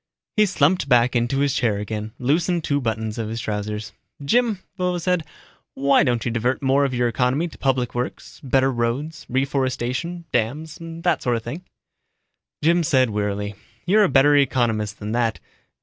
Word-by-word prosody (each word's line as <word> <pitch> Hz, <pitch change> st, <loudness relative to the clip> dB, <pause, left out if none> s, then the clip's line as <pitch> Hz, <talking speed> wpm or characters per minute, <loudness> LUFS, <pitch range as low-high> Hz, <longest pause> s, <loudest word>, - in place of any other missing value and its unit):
He 215 Hz, -1 st, +4 dB
slumped 185 Hz, -4 st, +2 dB
back 125 Hz, 0 st, +4 dB
into 120 Hz, +3 st, +1 dB
his 140 Hz, -2 st, +2 dB
chair 115 Hz, -7 st, +1 dB
again, 105 Hz, +1 st, -5 dB
loosened 165 Hz, +6 st, +1 dB
two 145 Hz, -1 st, 0 dB
buttons 110 Hz, -1 st, -2 dB
of 110 Hz, -1 st, -3 dB
his 115 Hz, +1 st, -4 dB
trousers. 105 Hz, -1 st, -4 dB, 0.3 s
"Jim," 235 Hz, -, +2 dB, 0.2 s
Vovo 180 Hz, -1 st, -1 dB
said, 180 Hz, -1 st, 0 dB, 0.5 s
"why 140 Hz, +1 st, +4 dB
don't 120 Hz, -3 st, 0 dB
you 120 Hz, -, 0 dB
divert 120 Hz, +4 st, -1 dB
more 135 Hz, +1 st, +3 dB
of 130 Hz, -2 st, -2 dB
your 120 Hz, 0 st, +2 dB
economy 125 Hz, +8 st, +1 dB
to 165 Hz, -, -13 dB
public 130 Hz, -3 st, 0 dB
works, 120 Hz, +1 st, -5 dB
better 135 Hz, 0 st, +2 dB
roads, 130 Hz, +6 st, -3 dB
reforestation, 135 Hz, +4 st, -1 dB
dams 150 Hz, +8 st, -2 dB
that 165 Hz, +1 st, -1 dB
sort 120 Hz, -1 st, +1 dB
of 115 Hz, -, -3 dB
thing." 155 Hz, +10 st, -6 dB, 1.0 s
Jim 170 Hz, +2 st, +4 dB
said 130 Hz, -7 st, +2 dB
wearily, 105 Hz, 0 st, -2 dB, 0.3 s
"You're 210 Hz, +4 st, +5 dB
a 195 Hz, -, +3 dB
better 145 Hz, +2 st, +5 dB
economist 120 Hz, -7 st, +1 dB
than 105 Hz, 0 st, -5 dB
that. 115 Hz, -1 st, 0 dB
130 Hz, 165 wpm, -22 LUFS, 115-155 Hz, 1.0 s, You're